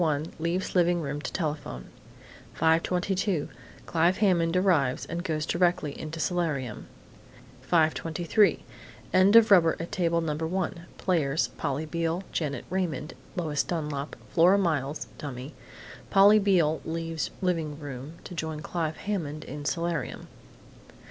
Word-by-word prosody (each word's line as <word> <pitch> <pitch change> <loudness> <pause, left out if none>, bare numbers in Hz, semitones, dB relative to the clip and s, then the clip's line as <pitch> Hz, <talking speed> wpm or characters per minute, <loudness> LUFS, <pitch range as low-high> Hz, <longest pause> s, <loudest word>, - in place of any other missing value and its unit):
1, 155 -1 -1
leaves 170 +3 -1
living 175 -1 +3
room 145 -2 -3
to - - -5
telephone. 150 - -3 0.7
5:22 180 +2 +1 0.4
Clive 170 +3 +2
Hammond 180 -4 +2
arrives 160 -7 +2
and 170 +1 -4
goes 155 -4 -1
directly 175 -4 +1
into 155 +3 -7
solarium. 150 - -2 0.8
5:23 165 +3 +2 0.5
End 185 +3 +5
of 230 -2 +7
rubber 165 -4 +6
at 165 - -5
Table 170 -2 +1
No. 160 -2 -1
1. 170 +1 -3
Players: 160 -5 +1
Polly 145 +4 -3
Beale, 165 +3 -2
Janet 145 -4 -2
Raymond, 170 -5 -2 0.2
Lois 155 -5 0
Dunlap, 150 -4 -3 0.2
Flora 180 +3 +5
Miles 155 -6 -1
(dummy). 135 0 -6 0.6
Polly 200 +2 +7
Beale 175 -6 +2
leaves 165 -1 -3
living 165 -6 -1
room 140 0 -7
to - - -9
join 160 -2 -4
Clive 160 -1 -3
Hammond 155 -7 -3
in 145 0 -7
solarium. 165 -2 -2
165 Hz, 125 wpm, -27 LUFS, 150-180 Hz, 0.8 s, of